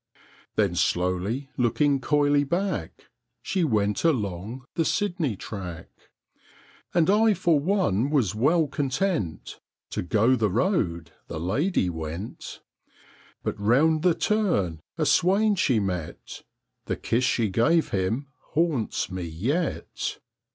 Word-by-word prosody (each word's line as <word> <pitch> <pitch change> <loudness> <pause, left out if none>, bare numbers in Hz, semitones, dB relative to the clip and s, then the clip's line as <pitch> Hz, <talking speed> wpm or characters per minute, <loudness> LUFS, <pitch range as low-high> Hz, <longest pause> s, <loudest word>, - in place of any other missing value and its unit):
Then 100 -5 +2
slowly, 90 +9 0
looking 135 +4 +2
coyly 145 0 +2
back, 170 - -3 0.4
She 190 -3 0
went 105 -8 +1
along 115 - -1
the 165 - +1
Sydney 175 - 0
track. 90 -5 -7 1.0
And 170 -2 +3
I 215 +1 +4
for 170 -4 +2
one 145 - +1
was 130 - +1
well 155 +9 +3
content 140 - -2 0.3
To - - -2
go 110 +8 +3
the 110 -4 +1
road 90 - 0 0.2
the 80 - -5
lady 105 - 0
went; 80 +4 -6 0.8
But - - -3
round 145 +10 +3
the 175 -1 +3
turn 170 - 0 0.2
a - - +1
swain 205 +4 +3
she 135 - +2
met 90 -5 -5 0.4
The - - -1
kiss 120 +3 0
she 115 -4 +1
gave 155 - +2
him 100 +8 -1 0.3
haunts 150 - 0
me 90 -1 -4
yet! 120 - -2
130 Hz, 120 wpm, -26 LUFS, -, 1.0 s, I